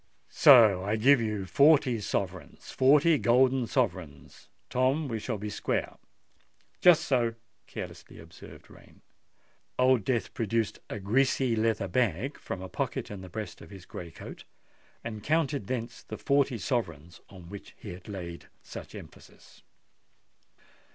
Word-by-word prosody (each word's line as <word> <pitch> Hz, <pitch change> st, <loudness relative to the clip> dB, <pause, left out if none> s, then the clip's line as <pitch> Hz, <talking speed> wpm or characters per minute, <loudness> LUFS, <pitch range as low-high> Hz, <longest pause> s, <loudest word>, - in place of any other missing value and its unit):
So 115 Hz, -9 st, +7 dB
if 95 Hz, -, -6 dB
I 110 Hz, -, +2 dB
give 125 Hz, +4 st, +4 dB
you 105 Hz, -3 st, -2 dB
forty 140 Hz, 0 st, +4 dB
sovereigns—forty 130 Hz, -, +1 dB
golden 125 Hz, +1 st, +3 dB
sovereigns, 95 Hz, -, -3 dB, 0.2 s
Tom—we 130 Hz, -1 st, 0 dB
shall 110 Hz, +1 st, -4 dB
be 105 Hz, +1 st, -6 dB
square." -, -, -2 dB, 0.8 s
"Just 175 Hz, -3 st, +6 dB
so," 120 Hz, -4 st, 0 dB, 0.3 s
carelessly -, -, -9 dB
observed -, -, -14 dB
Rain. -, -, -18 dB, 0.8 s
Old 130 Hz, -3 st, +3 dB
Death 115 Hz, -2 st, -1 dB
produced 115 Hz, 0 st, -1 dB
a 110 Hz, -, -5 dB
greasy 125 Hz, +4 st, +1 dB
leather 110 Hz, -3 st, 0 dB
bag 115 Hz, -, -1 dB
from 95 Hz, -, -6 dB
a -, -, -6 dB
pocket -, -, -4 dB
in 100 Hz, -2 st, -7 dB
the 95 Hz, -, -10 dB
breast 110 Hz, +4 st, -7 dB
of -, -, -12 dB
his 95 Hz, -2 st, -12 dB
grey 85 Hz, -, -8 dB
coat, -, -, -11 dB, 0.6 s
and 110 Hz, -2 st, -6 dB
counted 145 Hz, -7 st, 0 dB
thence 120 Hz, -1 st, -4 dB
the -, -, -8 dB
forty 140 Hz, -3 st, +1 dB
sovereigns 90 Hz, -, -4 dB
on 90 Hz, -3 st, -13 dB
which 100 Hz, +2 st, -11 dB
he 100 Hz, -, -9 dB
had 90 Hz, +1 st, -13 dB
laid 85 Hz, -4 st, -7 dB, 0.2 s
such -, -, -10 dB
emphasis. -, -, -14 dB
115 Hz, 135 wpm, -28 LUFS, 100-130 Hz, 0.8 s, So